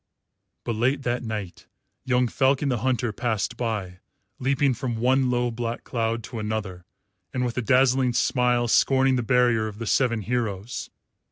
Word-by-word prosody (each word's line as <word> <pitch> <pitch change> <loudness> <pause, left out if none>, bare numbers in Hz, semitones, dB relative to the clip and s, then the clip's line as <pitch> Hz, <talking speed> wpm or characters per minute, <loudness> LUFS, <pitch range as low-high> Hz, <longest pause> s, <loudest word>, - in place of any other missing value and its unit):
But 120 - -2
late 135 +4 +1
that 120 -1 -1
night 105 -6 -6 0.4
young 125 -1 +2
Falcon 135 +3 +1
the 125 -3 0
Hunter 125 -1 0
passed 110 -3 -2
by, 105 -7 -3 0.4
leaping 135 +1 +2
from 125 0 -3
one 130 +2 +2
low 120 -1 0
black 115 0 -4
cloud 115 -1 -2
to 115 - -7
another, 105 -4 -4 0.5
and 125 0 0
with 120 - -3
a 125 - 0
dazzling 130 0 +3
smile 125 0 +2
scorning 135 +2 +3
the 125 - +1
barrier 120 -2 +2
of 105 -1 -8
the 115 - -5
seven 115 -1 +1
heroes. 110 -1 -3
120 Hz, 160 wpm, -25 LUFS, 110-130 Hz, 0.5 s, dazzling